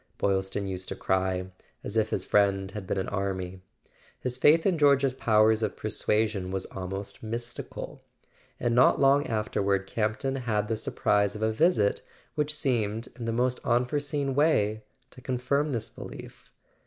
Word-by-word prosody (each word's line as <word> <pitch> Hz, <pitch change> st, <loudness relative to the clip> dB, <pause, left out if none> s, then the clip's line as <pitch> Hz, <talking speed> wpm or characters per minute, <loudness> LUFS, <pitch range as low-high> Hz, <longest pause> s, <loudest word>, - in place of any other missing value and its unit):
Boylston 95 Hz, 0 st, 0 dB
used 95 Hz, -1 st, -4 dB
to -, -, -4 dB
cry, 95 Hz, 0 st, -1 dB, 0.3 s
as 100 Hz, -, -6 dB
if 110 Hz, -1 st, +2 dB
his 95 Hz, -, -2 dB
friend 100 Hz, -1 st, +2 dB
had 95 Hz, -2 st, -7 dB
been -, -, -1 dB
an 95 Hz, -, -1 dB
army. 95 Hz, -2 st, -3 dB, 0.6 s
His 125 Hz, -1 st, -2 dB
faith 150 Hz, +5 st, +5 dB
in 185 Hz, -5 st, +2 dB
George's 140 Hz, -2 st, +4 dB
powers 110 Hz, -3 st, +3 dB
of 110 Hz, -, -2 dB
persuasion 105 Hz, -2 st, 0 dB
was 95 Hz, 0 st, -3 dB
almost 95 Hz, +1 st, -6 dB
mystical. 120 Hz, +2 st, -6 dB, 0.6 s
And 120 Hz, -, 0 dB
not 125 Hz, +2 st, +5 dB
long 140 Hz, +1 st, +4 dB
afterward 100 Hz, -3 st, 0 dB
Campton 110 Hz, +6 st, -1 dB
had 110 Hz, -4 st, -1 dB
the 115 Hz, -, +1 dB
surprise 105 Hz, -1 st, +1 dB
of 105 Hz, -, -4 dB
a 110 Hz, -, +2 dB
visit 110 Hz, -, +2 dB, 0.3 s
which 150 Hz, 0 st, -1 dB
seemed, 115 Hz, -6 st, -1 dB
in 120 Hz, -, -6 dB
the 115 Hz, -, -1 dB
most 125 Hz, +2 st, 0 dB
unforeseen 140 Hz, +3 st, 0 dB
way, 110 Hz, -8 st, +2 dB, 0.3 s
to 125 Hz, -, -13 dB
confirm 130 Hz, +4 st, 0 dB
this 115 Hz, -4 st, -2 dB
belief. -, -, -11 dB
110 Hz, 155 wpm, -28 LUFS, 100-130 Hz, 0.6 s, faith